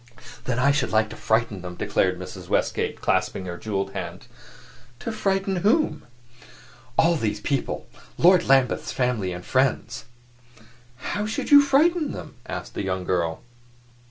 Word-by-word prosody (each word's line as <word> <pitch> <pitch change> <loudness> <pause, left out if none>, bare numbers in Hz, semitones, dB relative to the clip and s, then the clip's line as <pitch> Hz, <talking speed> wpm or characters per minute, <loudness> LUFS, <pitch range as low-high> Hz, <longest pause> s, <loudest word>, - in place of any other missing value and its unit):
"Then 125 -2 -1
I 140 +3 +4
should 140 -2 0
like 110 0 +2
to - - -7
frighten 110 -3 0
them," 90 0 -7
declared 90 +1 0
Mrs. 90 0 -9
Westgate, - - 0
clasping 95 - 0
her 90 -1 -5
jeweled 100 0 -3
hands. - - -6 0.7
"To 230 - -3
frighten 195 -2 0
whom?" 220 - +1 0.9
"All 170 +1 +4
these 105 -8 -1
people; 135 +4 -2 0.3
Lord 180 +1 +5
Lambeth's 135 -2 +3
family 125 -7 0
and 90 0 -7
friends." 130 0 0 1.1
"How 210 +1 -1
should 220 - -3
you 285 0 +10
frighten 305 +3 +3
them?" - - -8
asked - - -6
the - - -3
young 95 -1 -2
girl. 85 -3 -1
125 Hz, 145 wpm, -24 LUFS, -, 1.1 s, you